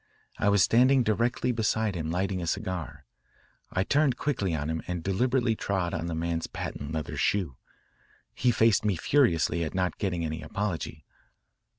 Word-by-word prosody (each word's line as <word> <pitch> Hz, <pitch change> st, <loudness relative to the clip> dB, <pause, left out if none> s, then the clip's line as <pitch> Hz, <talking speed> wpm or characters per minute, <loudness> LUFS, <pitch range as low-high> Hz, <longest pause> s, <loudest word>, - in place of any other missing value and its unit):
I 100 Hz, -, +3 dB
was 100 Hz, -3 st, +5 dB
standing 130 Hz, +5 st, +5 dB
directly 115 Hz, +3 st, +1 dB
beside 110 Hz, -2 st, 0 dB
him 80 Hz, -3 st, -3 dB
lighting 90 Hz, +2 st, -1 dB
a 85 Hz, -, -4 dB
cigar. 80 Hz, -5 st, -4 dB, 0.7 s
I 95 Hz, -, +1 dB
turned 140 Hz, +2 st, +2 dB
quickly 100 Hz, -, -1 dB
on 75 Hz, -1 st, -2 dB
him 80 Hz, 0 st, -2 dB
and 90 Hz, -2 st, -3 dB
deliberately 120 Hz, +5 st, +1 dB
trod 95 Hz, -5 st, -2 dB
on 85 Hz, 0 st, -2 dB
the 85 Hz, -, -3 dB
man's 85 Hz, 0 st, -2 dB
patent 70 Hz, +2 st, -6 dB
leather 80 Hz, -1 st, -4 dB
shoe. 90 Hz, -10 st, 0 dB, 0.8 s
He 125 Hz, -, +1 dB
faced 115 Hz, -3 st, +3 dB
me 105 Hz, -3 st, +1 dB
furiously 85 Hz, -, +2 dB
at 80 Hz, -, -4 dB
not 90 Hz, -1 st, -1 dB
getting 90 Hz, -4 st, -1 dB
any 80 Hz, +1 st, -4 dB
apology. 80 Hz, -2 st, -4 dB
95 Hz, 165 wpm, -28 LUFS, 80-115 Hz, 0.8 s, was